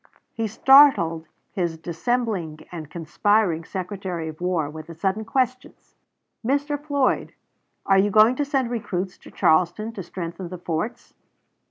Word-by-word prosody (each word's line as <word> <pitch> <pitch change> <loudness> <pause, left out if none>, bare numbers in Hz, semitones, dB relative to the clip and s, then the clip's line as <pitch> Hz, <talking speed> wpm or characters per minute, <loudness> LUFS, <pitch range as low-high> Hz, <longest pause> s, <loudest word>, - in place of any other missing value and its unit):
He 225 -1 -2
startled 215 - +5 0.3
his 175 -4 -2
dissembling 175 -2 -2
and 160 -4 -7
conspiring 170 +1 +1
Secretary 180 -3 -5
of 155 +2 -11
War 180 -4 0
with 155 +1 -9
the 165 - -9
sudden 195 +5 -1
questions, 255 +2 -2 0.5
"Mr. 285 +3 -1
Floyd, 285 -3 0 0.5
are 195 0 +4
you 205 +2 +3
going 215 +4 +5
to 290 - +1
send 270 -4 0
recruits 190 -5 -3
to - - -14
Charleston 175 +7 +2
to 205 - -6
strengthen 175 0 -6
the 180 - -7
forts?" 175 +6 -4
190 Hz, 140 wpm, -23 LUFS, 165-235 Hz, 0.5 s, startled